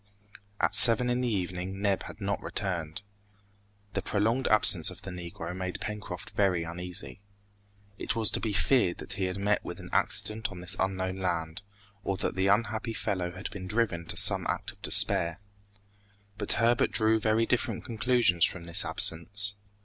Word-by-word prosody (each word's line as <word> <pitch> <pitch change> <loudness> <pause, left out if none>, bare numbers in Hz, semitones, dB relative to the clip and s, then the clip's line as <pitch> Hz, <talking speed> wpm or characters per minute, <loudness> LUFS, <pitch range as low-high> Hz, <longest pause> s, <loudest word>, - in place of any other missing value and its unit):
At - - +1
seven 125 +1 +7
in 125 +1 -1
the 125 - -1
evening 90 -1 -4
Neb 100 -1 0
had - - -11
not 100 -1 -3
returned. 85 -4 -4 0.9
The - - -1
prolonged 115 +6 0
absence 110 - +6
of - - -12
the 95 - -7
Negro 85 -1 -7
made 95 -1 -5
Pencroft 105 -5 -7
very 95 -5 +1
uneasy. 90 +3 -6 0.8
It - - -3
was 110 -2 +3
to - - 0
be 110 - -2
feared 100 -2 +2
that 100 - -4
he 100 -2 -2
had 90 +1 -4
met 105 +1 0
with - - -8
an - - -11
accident 110 +1 -1
on 90 - -9
this 90 +3 -4
unknown 95 -1 -2
land, 85 -1 -3 0.4
or 95 - -2
that - - -2
the 95 +1 0
unhappy 110 +2 0
fellow 90 -6 -3
had 95 +2 -7
been 95 -2 -8
driven 95 -6 -1
to - - -6
some - - +3
act - - -3
of - - -25
despair. 85 +2 +2 1.0
But - - +5
Herbert 120 +1 +2
drew 110 0 +2
very 110 +1 +1
different 120 -3 -2
conclusions 115 -6 +1
from 90 - +3
this 85 0 -2
absence. 100 +5 +2
100 Hz, 170 wpm, -28 LUFS, 90-110 Hz, 1.0 s, seven